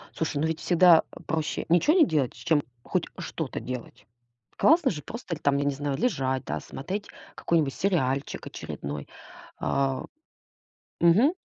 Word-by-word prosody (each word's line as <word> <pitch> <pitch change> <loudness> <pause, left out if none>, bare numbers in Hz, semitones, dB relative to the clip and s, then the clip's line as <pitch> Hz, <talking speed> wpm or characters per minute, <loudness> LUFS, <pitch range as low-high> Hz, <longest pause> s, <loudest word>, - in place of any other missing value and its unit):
Слушай, 155 -2 -2
ну 160 - +2
ведь 160 0 -2
всегда, 175 -2 +6
а, - - -12
проще 160 -1 -2
ничего 175 - +4
не 325 - +7
делать, 145 - 0
чем 160 -3 +1 0.2
хоть - - -1
что-то - - -4
делать. 125 -2 -7 0.5
Классно 320 -3 +5
же 150 -5 -5
просто 230 -7 -5
или 155 - -13
там, 140 0 +2
я 140 - 0
не 145 - +1
знаю, 140 -1 -2
лежать, 135 - 0
да, - - -2
смотреть 195 +9 -5 0.3
какой-нибудь 155 -5 +1
сериальчик 140 -8 -1
очередной, 70 0 -6 0.5
а. 135 -1 0 1.0
Мгм. 210 - +5
160 Hz, 150 wpm, -27 LUFS, 135-180 Hz, 1.0 s, не